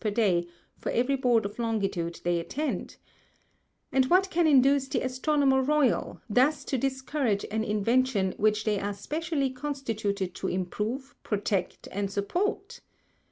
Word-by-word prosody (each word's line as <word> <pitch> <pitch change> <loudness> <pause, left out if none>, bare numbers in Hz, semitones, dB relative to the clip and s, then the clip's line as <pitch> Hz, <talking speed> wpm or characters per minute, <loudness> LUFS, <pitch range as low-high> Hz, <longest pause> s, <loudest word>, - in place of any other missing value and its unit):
per 215 - +1
Day 195 -5 +2 0.3
for - - -3
every 250 +4 +2
Board 245 -5 +2
of 205 +4 -6
Longitude 195 -7 -2
they 175 0 +1
attend) 290 - -3 0.9
and 265 - +4
what 375 +4 +3
can 340 -1 +3
induce 275 -1 +5
the - - -1
Astronomer 265 +1 +2
Royal, 285 -2 +1
thus 255 +8 +2
to - - -1
discourage 265 -4 -1
an 220 +1 0
Invention 215 -1 +1
which 215 0 +2
they 210 -2 +1
are 205 0 -3
specially 300 - -2
constituted 225 -9 -3
to - - -4
improve, 210 +9 -3
protect, 200 -3 -2
and 200 0 -2
support? 350 - -2
240 Hz, 140 wpm, -28 LUFS, 205-275 Hz, 0.9 s, induce